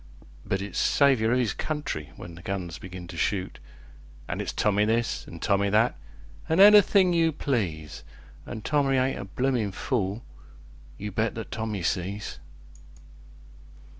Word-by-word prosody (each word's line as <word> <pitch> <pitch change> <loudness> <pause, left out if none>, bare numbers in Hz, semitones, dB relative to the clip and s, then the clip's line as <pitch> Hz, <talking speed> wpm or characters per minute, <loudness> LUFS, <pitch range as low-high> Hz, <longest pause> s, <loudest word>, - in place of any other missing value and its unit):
But 95 0 -2
it's 100 -3 -4
"Saviour 130 -6 +3
of 125 - +3
'is 115 -6 0
country" 150 - -4
when 85 - -10
the 85 - -11
guns 90 -4 -4
begin 90 -1 -8
to 85 - -8
shoot; 95 +2 -1 0.7
An' - - -3
it's - - -3
Tommy 105 0 +2
this, 115 +2 0
an' 85 - -9
Tommy 100 -1 +2
that, 110 +4 +3 0.5
an' 160 +3 +2
anything 200 -2 +7
you 165 -1 +3
please; 95 - -3 0.4
An' 110 - -6
Tommy 140 -3 +2
ain't 130 +1 0
a - - -5
bloomin' 120 0 -1
fool 105 +1 -2 0.7
you 105 +1 -5
bet 110 +3 -1
that 110 - -7
Tommy 110 -4 -3
sees! 100 +4 -3
105 Hz, 145 wpm, -26 LUFS, 95-130 Hz, 0.7 s, anything